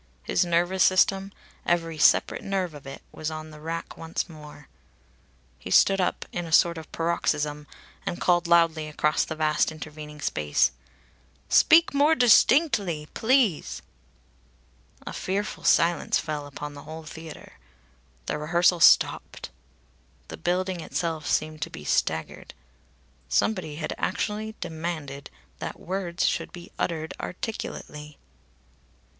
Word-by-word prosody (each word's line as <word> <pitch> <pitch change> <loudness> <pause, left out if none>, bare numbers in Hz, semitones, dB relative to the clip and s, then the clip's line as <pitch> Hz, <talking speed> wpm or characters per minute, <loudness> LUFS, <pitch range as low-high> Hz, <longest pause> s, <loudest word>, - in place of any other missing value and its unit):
His - - +1
nervous 175 +2 +2
system, 195 +1 +3 0.3
every 165 -2 -1
separate - - +4
nerve 190 -4 -2
of 145 -2 -11
it, 135 - -9
was 155 - -4
on 155 0 -7
the 150 - -12
rack 165 +1 -5
once 165 0 -3
more. 150 -3 -13 0.9
He - - -8
stood 195 -1 +5
up 180 - -1
in 175 -1 -4
a - - -9
sort 170 +1 +4
of 160 - -13
paroxysm 150 -3 -1 0.4
and 175 - -4
called 175 -1 +2
loudly 165 -2 +3
across 150 0 +1
the 160 - -5
vast 155 0 +1
intervening 150 -1 -9
space: 75 - +1 0.8
"Speak 330 0 +6
more 290 +3 +4
distinctly, 225 - +4
please." 220 - +1 1.2
A - - -6
fearful 200 +3 -3
silence 170 -1 +3
fell 150 -2 -4
upon 145 +1 -7
the 145 - -10
whole 160 +1 -9
theatre. 160 0 -11 0.7
The 150 - -3
rehearsal 175 +3 +3
stopped. - - +3 0.8
The - - -6
building 180 +1 -1
itself 160 -2 -3
seemed 155 0 -1
to - - -2
be 75 - -10
staggered. 80 +2 -1 0.7
Somebody 155 - 0
had 155 +1 -4
actually 215 +1 -2
demanded 160 -4 -5 0.3
that - - -6
words 185 -1 -2
should - - -1
be 175 -1 -11
uttered 160 -2 -2
articulately! 150 -7 -6
165 Hz, 125 wpm, -26 LUFS, 150-185 Hz, 1.2 s, Speak